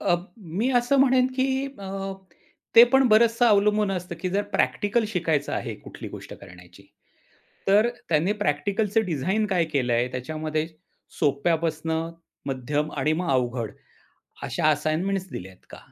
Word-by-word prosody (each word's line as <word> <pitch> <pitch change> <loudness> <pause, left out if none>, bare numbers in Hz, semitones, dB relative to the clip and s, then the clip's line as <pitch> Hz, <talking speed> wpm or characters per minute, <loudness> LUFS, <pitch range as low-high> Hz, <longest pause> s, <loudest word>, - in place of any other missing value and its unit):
अ, - - +2 0.4
मी 245 +5 +2
असं 245 +3 +1
म्हणेन 260 -1 +4
की 260 0 +2 0.3
अ, 195 - -8 0.9
ते 230 - +11
पण 265 -1 +5
बरंचसं 230 +2 +4
अवलंबून 210 -1 +3
असतं, 180 -2 -4
की 185 - -1
जर 200 +2 +1
प्रॅक्टिकल 215 +3 +1
शिकायचं 165 -7 -1
आहे - - -3
कुठली - - -8
गोष्ट - - -9
करण्याची, 90 -1 -15 0.9
तर 210 +4 +5 0.2
त्यांनी 165 +5 +2
प्रॅक्टिकलचं 200 +8 +1
डिझाइन 185 +7 0
काय 180 -4 +1
केलंय 125 -2 +1
त्याच्यामध्ये 155 +4 -3 0.5
सोप्या 150 +2 +2
पसनं 160 +1 -2 0.3
मध्यम 145 +3 -2
आणि 145 +3 +1
मग 170 0 -1
अवघड. 120 -3 -1 0.7
अशा - - 0
असाइनमेंट्स 165 +6 0
दिल्यात 95 0 -9
का? - - -10
170 Hz, 135 wpm, -25 LUFS, 145-210 Hz, 0.9 s, ते